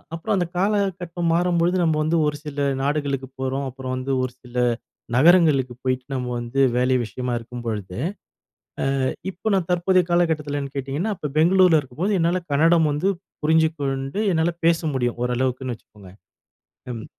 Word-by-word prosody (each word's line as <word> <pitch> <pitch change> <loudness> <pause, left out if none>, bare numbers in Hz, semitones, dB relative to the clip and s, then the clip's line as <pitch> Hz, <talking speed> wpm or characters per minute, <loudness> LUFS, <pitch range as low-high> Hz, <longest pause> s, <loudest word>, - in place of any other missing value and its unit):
அப்றம் 205 +5 -1
அந்த 180 -2 +1
காலகட்டம் 185 -4 0
மாறும்பொழுது 175 +1 +2
நம்ம 160 -2 +2
வந்து 165 +2 +1
ஒரு 150 - -1
சில 145 -1 -4 0.2
நாடுகளுக்கு 140 -2 -1
போறோம். 135 +1 -2
அப்றம் 130 0 -6
வந்து 130 +1 -3
ஒரு 130 - -2
சில 125 0 -14 0.6
நகரங்களுக்கு 150 -4 +5
போயிட்டு 130 -1 -1
நம்ம 125 -1 -2
வந்து 120 +3 -3 0.2
வேலை 130 +1 +3
விஷயமா 125 +2 -4
இருக்கும் 120 +1 -8
பொழுது. 105 -5 -4 1.1
அ - - +2 0.2
இப்போ 185 +3 -7
நான் 185 -4 +1
தற்போதைய 180 +1 +3
காலகட்டத்திலனு 150 -5 0
கேட்டிங்கன்னா, 140 +10 -2
அப்போ 150 - -4
பெங்களூர்ல 175 0 +5
இருக்கும்போது 165 +11 -2
என்னால 175 +2 +1
கன்னடம் 160 +2 +4
வந்து 150 +7 0 0.3
புரிஞ்சுக்கொண்டு 155 0 +1
என்னால 165 +1 +1
பேச 165 0 +4
முடியும் 120 -2 -1
ஓரளவுக்குன்னு 125 0 -1
வச்சுக்கோங்க. 105 -3 -17 0.8
ம். 110 -2 -7
145 Hz, 145 wpm, -23 LUFS, 130-175 Hz, 1.1 s, நகரங்களுக்கு